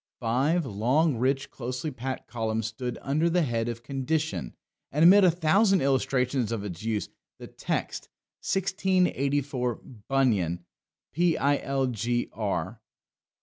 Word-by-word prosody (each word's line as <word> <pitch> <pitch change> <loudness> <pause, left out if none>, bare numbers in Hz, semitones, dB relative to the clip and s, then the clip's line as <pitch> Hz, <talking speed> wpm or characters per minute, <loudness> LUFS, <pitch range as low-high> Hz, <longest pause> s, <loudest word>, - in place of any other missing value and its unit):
Five 135 +8 +1
long, 130 +7 +1
rich, 135 +3 0
closely 125 +4 -4
packed 130 +1 -5
columns 110 -1 -2
stood 120 +3 -4
under 155 +5 +1
the 175 0 +2
head 115 -4 -1
of 115 0 -6
"Condition"; 140 - -2 0.4
and 150 +3 +2
amid 195 +4 +8
a 185 - +7
thousand 185 +4 +3
illustrations 130 -3 +1
of 110 -3 -2
its 95 -2 -6
use, 110 -2 -2 0.3
the - - -9
text: - - -4 0.3
"1684, 145 - 0 0.3
Bunyan, 100 -11 +1 0.5
Pilgr. 120 - 0
130 Hz, 110 wpm, -27 LUFS, 115-155 Hz, 0.5 s, amid